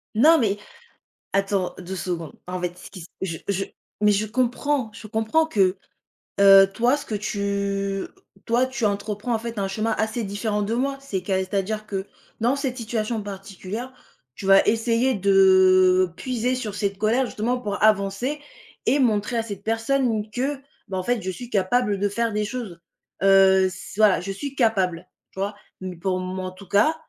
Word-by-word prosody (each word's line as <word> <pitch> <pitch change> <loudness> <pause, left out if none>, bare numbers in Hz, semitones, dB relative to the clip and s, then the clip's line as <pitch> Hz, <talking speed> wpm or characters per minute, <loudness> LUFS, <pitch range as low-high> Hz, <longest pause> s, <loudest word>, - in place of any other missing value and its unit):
Non 315 +9 +6
mais, 205 -6 +1 0.8
attends 195 -2 0
2 185 +1 -6
secondes. 170 -4 -4
En 180 0 -4
fait, 180 0 -3
ce 180 - -12
qui 195 - -10
s 165 - -9 0.2
je 165 -4 -3
je 195 0 0 0.4
mais 210 0 +5
je 210 +2 0
comprends 255 +2 0
je 215 0 -10
comprends 225 +9 +1
que, 195 -9 +2 0.6
heu, 195 -1 +8
toi 245 +5 +2
ce - - -8
que - - -6
tu 200 -1 -2 0.4
toi 240 +2 +2
tu 260 -3 -2
entreprends 210 +3 -1
en - - -1
fait 230 -1 -5
un 195 - 0
chemin 215 +3 -1
assez 220 +1 -1
différent 210 +1 -2
de 215 +3 -2
moi, 275 +3 -1
c'est 200 -9 -3
qu'à 190 +1 -1
c'est-à-dire 200 +3 -2
que, 195 -1 -4 0.4
dans 245 +4 +3
cette 265 -3 -3
situation 225 -1 -2
particulière, 200 +5 -7 0.4
tu 195 - -9
vas 195 0 +6
essayer 230 +3 +2
de 185 -2 +5
puiser 250 0 -1
sur 220 -5 -4
cette 200 -2 -2
colère 225 +5 +2
justement 240 +3 -1
pour 205 -4 -4
avancer 215 +7 +2 0.5
et 285 - +3
montrer 230 -1 +1
à 225 - 0
cette 200 -3 -7
personne 225 -1 0
que, 270 +4 -1 0.3
bah 190 -1 -4
en 185 - -2
fait, 240 +2 0
je 185 - -4
suis 245 +5 -9
capable 205 0 +1
de 205 0 +1
faire 230 +1 -1
des 210 0 0
choses. 210 -7 -6 0.4
Heu, 190 -1 +5
c 185 - -10
voilà, 215 -3 +5
je 195 +2 -4
suis 275 +7 -6
capable, 185 -8 +1 0.2
tu - - -11
vois? 200 +1 -2 0.3
Mais 185 -1 -5
pour 185 +2 -1
moi, 185 0 -4
en - - -6
tout 185 0 -14
cas, 215 - +3
205 Hz, 185 wpm, -24 LUFS, 195-235 Hz, 0.8 s, heu